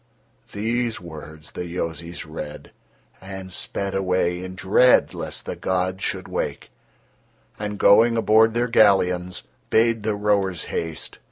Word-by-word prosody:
These 115 +3 -1
words 80 -2 -10
the - - -5
Yozis 85 -1 -4
read, 75 -1 -8 0.5
and 95 0 -8
sped 100 +2 -4
away 90 -2 0
in 95 0 -7
dread 100 +7 +4
lest - - -5
the - - -4
gods 95 +1 -1
should 95 0 -2
wake, - - -4 0.9
and 105 -1 -4
going 115 +4 +5
aboard 110 0 +4
their 120 +1 +1
galleons, 90 -6 +3 0.3
bade 115 0 +3
the 105 0 -1
rowers 100 -4 +1
haste. 80 -1 -4
95 Hz, 125 wpm, -23 LUFS, 90-110 Hz, 0.9 s, going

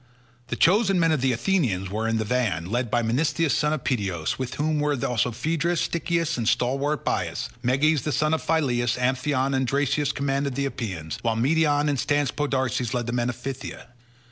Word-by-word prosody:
The - - -3
chosen 195 - +3
men 165 -1 +3
of 155 -5 +1
the 130 0 +2
Athenians 115 - 0
were 110 +2 -1
in 115 0 +1
the 110 - -1
van, 105 -8 0
led 120 0 0
by 120 +1 +1
Menestheus 145 +6 +1
son 150 0 +1
of 155 -4 -2
Peteos, 95 -9 -1
with 130 -1 -3
whom 155 +1 0
were 145 0 +1
also 125 -1 +1
Pheidas, 160 +7 -1
Stichius, 165 -2 -1
and 115 -1 +1
stalwart 135 +5 0
Bias; - - -2
Meges 145 +3 +2
son 155 +2 +1
of 160 - 0
Phyleus, 125 -7 +1
Amphion, 130 +2 0
and 130 -1 +1
Dracius 145 +1 +1
commanded 140 -1 -1
the 140 - 0
Epeans, 95 - -4
while 115 -1 0
Medon 145 +4 +2
and 145 -3 0
staunch 145 0 0
Podarces 130 -4 -1
led 120 -1 -1
the 120 - -3
men 120 0 0
of 125 - -3
Phthia. 135 -1 -7
135 Hz, 190 wpm, -25 LUFS, 120-150 Hz, -, chosen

